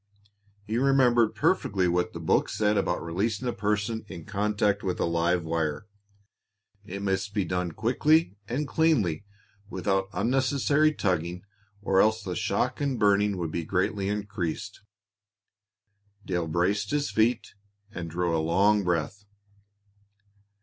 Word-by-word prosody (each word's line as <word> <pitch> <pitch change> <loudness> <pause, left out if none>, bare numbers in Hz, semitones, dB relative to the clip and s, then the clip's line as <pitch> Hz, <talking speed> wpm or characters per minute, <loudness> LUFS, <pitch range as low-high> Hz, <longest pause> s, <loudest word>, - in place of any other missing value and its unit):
He 110 +2 -1
remembered 125 -4 +3
perfectly 95 -2 +1
what 90 0 0
the - - -6
book - - +1
said 105 0 +1
about - - 0
releasing 105 +8 -2
a 120 - -1
person 105 +2 -1
in 85 -5 -9
contact 105 0 0
with 95 -2 -3
a - - +1
live 85 +1 +1
wire. 80 +1 -2 1.0
It 100 0 -7
must 100 +1 -2
be 100 -3 +1
done 90 -1 -2
quickly 150 - +2
and 140 +5 -2
cleanly, 115 - +1 0.4
without 95 -3 -1
unnecessary 135 +8 +2
tugging, 90 - -2 0.4
or 95 -1 +3
else 110 0 +2
the 90 -2 -4
shock - - -1
and 140 -3 0
burning 100 -1 +2
would 85 -3 -3
be 85 - -2
greatly 95 +3 -1
increased. 100 -1 -4 1.4
Dale 90 -3 -1
braced 95 +5 0
his 145 -1 -1
feet 115 +2 +1 0.4
and 85 -5 -6
drew 85 0 -1
a 80 - +1
long 100 +6 +3
breath. 90 +3 -2
100 Hz, 135 wpm, -27 LUFS, 90-110 Hz, 1.4 s, remembered